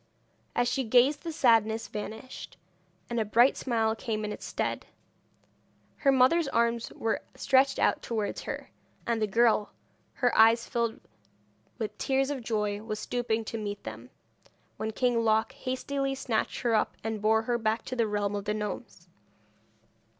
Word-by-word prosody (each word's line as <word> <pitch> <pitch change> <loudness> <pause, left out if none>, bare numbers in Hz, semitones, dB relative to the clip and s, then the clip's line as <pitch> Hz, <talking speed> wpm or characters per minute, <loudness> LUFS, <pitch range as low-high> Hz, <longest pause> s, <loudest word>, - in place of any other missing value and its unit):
As 245 - +2
she 265 +2 0
gazed 255 +5 +4
the 335 - -4
sadness 225 -6 +3
vanished, 220 +4 -7 0.5
and 235 -1 -2
a - - +2
bright 235 +5 +4
smile 225 -3 0
came 215 -1 -3
in 210 - -3
its - - -7
stead. - - -3 1.1
Her 275 - +3
mother's 270 +5 +4
arms 235 -2 0
were 225 - -1
stretched 270 0 +3
out - - +2
towards 215 -3 -3
her, - - -6 0.3
and 230 -1 0
the 215 - +2
girl, 220 0 +2 0.4
her 245 -3 +1
eyes 225 +1 +6
filled 235 -1 -1 0.8
with 215 -3 -4
tears 270 +1 +1
of 275 -3 -3
joy, 210 -2 -1
was 215 -1 -4
stooping 225 0 -2
to 225 - -4
meet 205 -1 -5
them, 110 +3 -8 0.7
when 220 - -2
King 235 +1 +1
Loc 220 +2 +2
hastily 270 +1 -2
snatched 245 -4 -2
her 235 -2 +1
up, 215 - +1
and 220 -1 -3
bore 220 +1 +3
her 240 +1 0
back 220 0 0
to 255 - -4
the 230 -3 +1
realm 205 -1 -1
of 200 -1 -4
the 210 0 -1
gnomes. 210 -1 -6
225 Hz, 160 wpm, -29 LUFS, 215-250 Hz, 1.1 s, eyes